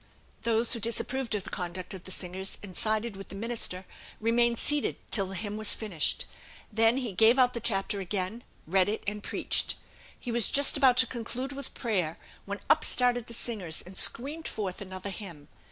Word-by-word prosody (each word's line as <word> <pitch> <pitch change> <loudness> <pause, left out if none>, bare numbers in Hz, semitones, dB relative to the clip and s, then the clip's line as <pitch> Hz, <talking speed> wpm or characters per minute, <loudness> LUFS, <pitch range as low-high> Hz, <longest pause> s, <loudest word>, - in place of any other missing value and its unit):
Those 230 +1 +3
who 235 - +3
disapproved 235 +2 -2
of 200 - -3
the 200 - -9
conduct 180 +1 -5
of 185 -2 -10
the - - -8
singers, 185 +1 -4
and 190 -3 -10
sided 215 +1 -1
with 195 0 -10
the - - -8
minister, 205 -4 -2 0.3
remained 235 +1 +2
seated 295 +3 +2 0.2
till 195 -4 +8
the 195 - -7
hymn 210 +2 -4
was 215 -1 +3
finished. 190 -9 0 0.5
Then 225 +3 +4
he 250 -5 -2
gave 225 +6 +5
out 250 -1 +4
the 235 - -3
chapter 200 -3 0
again, 195 +4 -3 0.2
read 185 +3 +2
it, 215 - -3
and 210 +1 -3
preached. - - -1 0.4
He 245 - -5
was 235 -2 +2
just 285 0 +5
about 265 -3 +5
to 255 - +8
conclude 250 +2 -5
with 280 0 -8
prayer, 185 -9 -1 0.3
when 200 +1 -5
up - - +4
started 245 -2 +2
the 235 - -7
singers 195 -10 -4
and 185 +2 -12
screamed 290 +11 +2
forth 195 -4 -4
another 185 0 -6
hymn. 170 -7 -8
215 Hz, 190 wpm, -29 LUFS, 190-240 Hz, 0.5 s, till